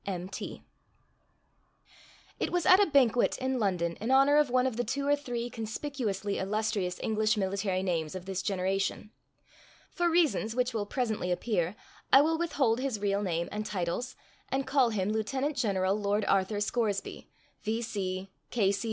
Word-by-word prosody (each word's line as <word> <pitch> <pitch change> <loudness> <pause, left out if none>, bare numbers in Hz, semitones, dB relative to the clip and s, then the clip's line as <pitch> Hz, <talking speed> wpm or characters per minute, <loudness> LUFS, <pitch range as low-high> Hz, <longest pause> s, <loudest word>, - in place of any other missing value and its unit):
—M.T.] 185 0 -5 1.8
It - - -1
was 355 -3 0
at 370 - +7
a 405 - +5
banquet 250 -5 +3
in 260 -1 -1
London 175 -5 0
in 225 - -2
honor 275 +2 +5
of 300 -3 +4
one 255 +1 +2
of 260 -3 -1
the 245 - 0
two 280 +5 -2
or 290 - +5
three 245 -4 -4
conspicuously 220 -3 -3
illustrious 205 -2 -1
English 220 0 +1
military 195 -1 -1
names 165 -3 -1
of 185 -1 -6
this 190 -1 -3
generation. 195 +2 -1 0.8
For 350 -1 +1
reasons 310 -10 +2
which 250 0 0
will 210 -3 -2
presently 220 -7 -1
appear, 180 -1 0 0.4
I 270 - +9
will 320 +2 +1
withhold 270 -9 +1
his 260 -5 -2
real 200 0 0
name 170 -3 -1
and 210 0 -3
titles, 200 +6 -3 0.3
and 270 0 -1
call 265 -2 +3
him 210 -2 -1
Lieutenant 265 +7 -1
General 195 -7 +1
Lord 205 0 0
Arthur 195 +2 +1
Scoresby, 210 -2 -2 0.3
V.C. 205 -4 -3
215 Hz, 150 wpm, -30 LUFS, 195-260 Hz, 1.8 s, I